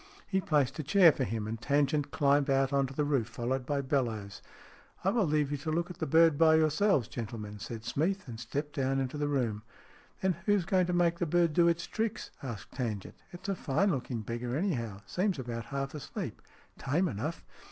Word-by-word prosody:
He 190 -1 0
placed 150 -4 +1
a - - -1
chair 170 +3 +7
for 135 - -2
him, 110 -2 -3
and 115 +1 -5
Tangent 145 +2 +1
climbed 145 -1 +2
out 135 0 +2
on 140 -1 +3
to 135 - -9
the 150 - +1
roof, 135 -6 +1
followed 125 +2 -3
by 145 -1 0
Bellowes. 115 -8 -2 0.3
" - - -26
I 190 - +3
will 225 -3 +2
leave 150 -1 +1
you 145 - -1
to 150 +3 -4
look 170 +3 -1
at - - -11
the - - -1
bird 160 0 +5
by 160 -1 +6
your 155 -1 +4
selves, 155 - +2
gentlemen," 105 -3 -6
said 110 +3 -7
Smeath, 185 +5 -1
and 115 -2 -7
stepped 145 +6 -4
down 135 0 +1
into 135 +2 -3
the 145 - 0
room. 120 -7 0 0.6
"Then 190 -2 +2
who's 205 -4 +3
going 185 -1 +2
to 180 - -1
make 170 -1 +2
the 175 - 0
bird 170 0 +3
do 170 +2 +5
its 170 0 +1
tricks? 225 -1 -3
" - - -27
asked 120 -7 -7
Tangent. 110 -7 -4
" - - -32
It's 175 +1 -9
a 200 - +1
fine 190 +3 +1
looking 125 -4 -3
beggar, 120 +3 -3
anyhow. 120 - -2
Seems 185 - 0
about 120 -3 -5
half 135 +1 -4
asleep. 150 -4 -6 0.4
Tame 150 +8 +1
enough." 150 - -4
145 Hz, 220 wpm, -31 LUFS, 120-170 Hz, 0.6 s, chair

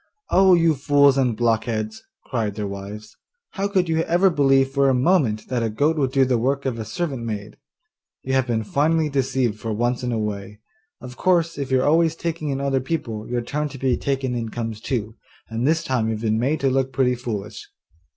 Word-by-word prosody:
'Oh, 190 -1 +6
you 165 -2 +3
fools 140 0 +4
and 125 -5 +1
blockheads!' 110 -2 -1 0.2
cried 110 -5 -2
their 105 -1 -3
wives, 100 +2 -8 0.4
'how 200 0 -2
could 190 -3 +1
you 160 0 +1
ever 175 +3 +3
believe 135 -3 +3
for 140 0 +2
a 130 - +3
moment 125 - +2
that 125 -2 -1
a 115 - 0
goat 145 +9 +1
would 135 -4 0
do 135 0 +3
the 125 -2 +1
work 140 +4 0
of 125 -3 -2
a 110 - -4
servant 140 - -3
maid? 105 -2 -5 0.7
You 130 - -2
have 130 -1 +2
been 115 -2 0
finely 155 +7 +1
deceived 130 -5 0
for 115 - -4
once 120 +3 0
in 125 -1 -2
a 115 - -1
way. 105 -1 -4 0.4
Of 125 0 -10
course, 170 -3 +2
if 140 -1 -4
you 130 -1 +3
are - - +1
always 165 +1 +3
taking 165 -2 -3
in 135 -1 -2
other 135 -1 0
people, 120 -7 -4
your 120 0 -1
turn 150 +5 -3
to 140 - -9
be 130 -1 +1
taken 135 -2 -2
in 115 -2 -3
comes 115 -1 -5
too, 115 -4 -3 0.3
and 115 +3 -1
this 165 +2 +2
time 125 -6 0
you've 110 -1 -3
been 110 -1 +1
made 140 +6 0
to 135 -1 +2
look 135 0 0
pretty 130 -2 +2
foolish. 110 -5 -6
130 Hz, 215 wpm, -22 LUFS, 115-145 Hz, 0.7 s, Oh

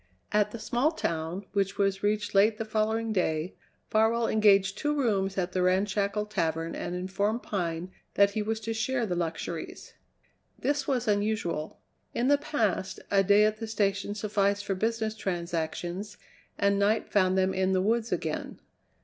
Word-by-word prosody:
At 210 0 +3
the 235 - -7
small 240 +7 +1
town, 170 - -3
which 200 -1 0
was 195 -1 +1
reached 205 0 0
late 210 +2 +4
the 225 - -3
following 220 +1 0
day, 165 -3 0 0.4
Farwell 225 +1 +3
engaged 200 -2 +4
two 295 0 0
rooms 195 -8 0
at 180 -1 -1
the 185 - 0
ramshackle 200 +3 +1
tavern 165 -5 -1
and 175 - -4
informed 200 +5 -1
Pine 175 -2 -3 0.2
that 200 0 +5
he 215 - -2
was 220 +1 -2
to 225 +1 -3
share 245 +2 0
the 185 - -2
luxuries. 165 -1 -4 0.6
This 290 -1 -1
was 250 -5 0
unusual. 205 -6 -1 0.4
In 245 +3 +1
the 285 0 +5
past 220 -11 -1
a 200 -1 +5
day 205 +2 +5
at 215 0 +1
the 225 0 -5
station 200 -2 0
sufficed 205 -1 0
for 200 - 0
business 220 +2 -1
transactions, 175 +1 -3 0.4
and 200 0 +2
night 210 +2 +2
found 185 -2 +3
them 190 0 +2
in 190 0 +1
the 185 - +3
woods 225 +3 0
again. - - -3
205 Hz, 165 wpm, -28 LUFS, 190-220 Hz, 0.6 s, that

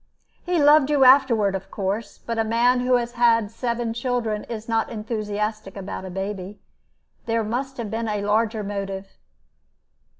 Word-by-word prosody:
"He 355 -1 0
loved 295 -1 +6
you 290 -2 +4
afterward, 255 -6 +5
of 195 0 -5
course. 200 +2 -3
But 230 -1 -4
a - - +3
man 235 +3 +2
who 250 0 +2
has 240 -1 0
had 230 -3 +3
seven 235 0 -2
children 235 -3 -2
is 225 -2 -7
not 225 -1 0
enthusiastic 215 -2 -4
about 190 -1 -6
a - - -6
baby. 195 +1 -5 0.7
There 230 0 +1
must 260 +5 -3
have 230 -4 -5
been 225 +1 -2
a 210 -1 -2
larger 215 +1 +1
motive." 195 -1 -5
225 Hz, 160 wpm, -23 LUFS, 205-240 Hz, 0.7 s, loved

